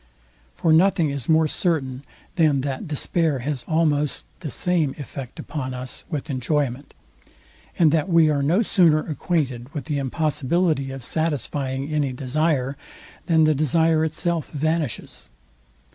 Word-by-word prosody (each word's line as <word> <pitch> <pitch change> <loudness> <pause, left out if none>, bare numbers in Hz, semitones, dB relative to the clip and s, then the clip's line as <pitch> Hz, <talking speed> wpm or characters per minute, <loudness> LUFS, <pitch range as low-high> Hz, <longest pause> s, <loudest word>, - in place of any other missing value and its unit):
For 160 - +2
nothing 165 -2 +4
is 140 -1 -5
more 160 0 +4
certain, 140 -6 -1 0.3
than 155 -5 +3
that 135 +1 -4
despair 155 0 0
has 145 -4 -2
almost 150 -3 +1
the 165 -4 -5
same 160 -1 0
effect 135 -3 -8
upon 130 -4 -5
us 125 0 -6
with 150 -2 -4
enjoyment, 135 +1 -2 0.8
and 160 -3 +5
that 160 +3 +1
we 165 -2 +5
are 145 -2 +1
no 170 +11 +3
sooner 170 -7 +4
acquainted 140 -6 -2
with 140 -4 -4
the 145 0 -1
impossibility 150 +1 0
of 135 -1 -7
satisfying 145 -1 -2
any 145 -3 0
desire, 135 +1 0 0.5
than 160 -2 +4
the 155 0 +4
desire 155 +2 +2
itself 160 0 -1
vanishes. 155 -3 -2
150 Hz, 135 wpm, -23 LUFS, 135-160 Hz, 0.8 s, and